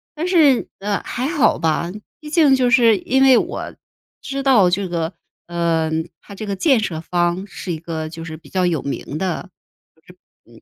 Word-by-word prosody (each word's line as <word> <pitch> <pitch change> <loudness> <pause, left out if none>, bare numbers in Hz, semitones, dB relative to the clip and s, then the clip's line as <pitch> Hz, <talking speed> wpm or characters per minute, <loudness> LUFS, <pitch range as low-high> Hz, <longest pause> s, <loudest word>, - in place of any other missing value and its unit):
但 320 +3 -2
是 310 -8 +4
呃 200 +1 -1
还 255 +2 -3
好 300 -3 +2
吧， 165 +1 0 0.3
毕 305 - -12
竟 300 -4 +5
就 250 -2 +2
是 235 -4 +5
因 265 +8 0
为 265 -2 +7
我 - - -3 0.5
知 275 0 -4
道， 250 -9 +5
这 190 0 -1
个 165 0 -2 0.3
嗯 165 -1 -1
它 200 - -12
这 215 - -7
个 200 - -2
建 265 - +3
设 170 -7 -3
方， 175 +2 -1
是 190 -2 -7
一 165 - -2
个 160 -1 -5
就 165 0 -8
是 160 -1 -7
比 165 - -18
较 185 -1 0
有 170 -4 0
名 140 +2 -5
的， 185 +1 -3 1.1
就 - - -18
190 Hz, 200 characters per minute, -20 LUFS, 165-255 Hz, 1.1 s, 为